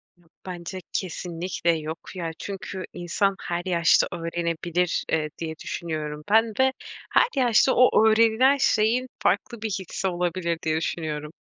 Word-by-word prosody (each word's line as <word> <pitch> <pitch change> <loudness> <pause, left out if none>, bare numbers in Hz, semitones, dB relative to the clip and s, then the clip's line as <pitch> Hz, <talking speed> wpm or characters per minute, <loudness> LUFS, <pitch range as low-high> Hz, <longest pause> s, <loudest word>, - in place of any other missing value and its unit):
Yok. 175 -2 -29
Bence 180 0 -6
kesinlikle 175 -1 -2
yok 155 +1 -5 0.2
ya. 170 -3 -3
Çünkü 195 -1 -6
insan 195 +3 0
her 175 0 -2
yaşta 170 -2 +4
öğrenebilir, 170 0 -1
ııı, 155 -1 +1
diye 160 -1 -4
düşünüyorum. 150 -3 -4
Ben 220 0 +4
de 265 0 +3 0.4
her - - +5
yaşta 245 +1 +4
o 245 -3 +5
öğrenilen 230 +5 +4
şeyin 240 0 +2
farklı 235 -3 0
bir 220 - -2
hissi 190 -1 -3
olabilir 175 -1 -1
diye 155 0 +1
düşünüyorum. 155 -2 -3
175 Hz, 135 wpm, -25 LUFS, 165-215 Hz, 0.4 s, her